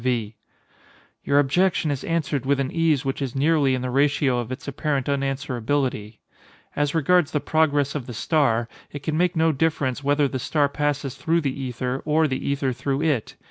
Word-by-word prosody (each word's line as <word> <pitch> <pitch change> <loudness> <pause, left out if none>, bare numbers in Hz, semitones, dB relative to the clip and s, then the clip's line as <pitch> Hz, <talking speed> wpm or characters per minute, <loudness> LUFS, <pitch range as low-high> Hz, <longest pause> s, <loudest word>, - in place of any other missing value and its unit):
V. 115 -4 -1 0.9
Your 140 - +2
objection 155 +3 +2
is 140 - -3
answered 155 -5 -1
with 140 +1 +1
an 135 -1 -1
ease 160 -4 +1
which 135 +1 -2
is 135 -2 -3
nearly 140 -1 +3
in 130 - -4
the 125 - -2
ratio 140 -1 +2
of 120 0 -5
its 130 - -7
apparent 140 -1 -1
unanswerability.—As 135 0 -3
regards 165 +1 +3
the 150 - +2
progress 145 -2 +1
of 140 -5 -5
the 120 - -6
star, 120 -4 +1 0.2
it 145 -1 -7
can 155 0 -1
make 180 +2 +1
no 160 0 +3
difference 145 -3 -1
whether 145 +1 +2
the 130 -1 -4
star 145 +3 +1
passes 145 -2 -1
through 165 +1 0
the 135 -3 -1
ether 130 -1 -3
or 155 +1 +2
the 130 -2 -3
ether 140 -2 0
through 135 +4 -2
it. 145 -9 0
140 Hz, 180 wpm, -23 LUFS, 130-150 Hz, 0.9 s, nearly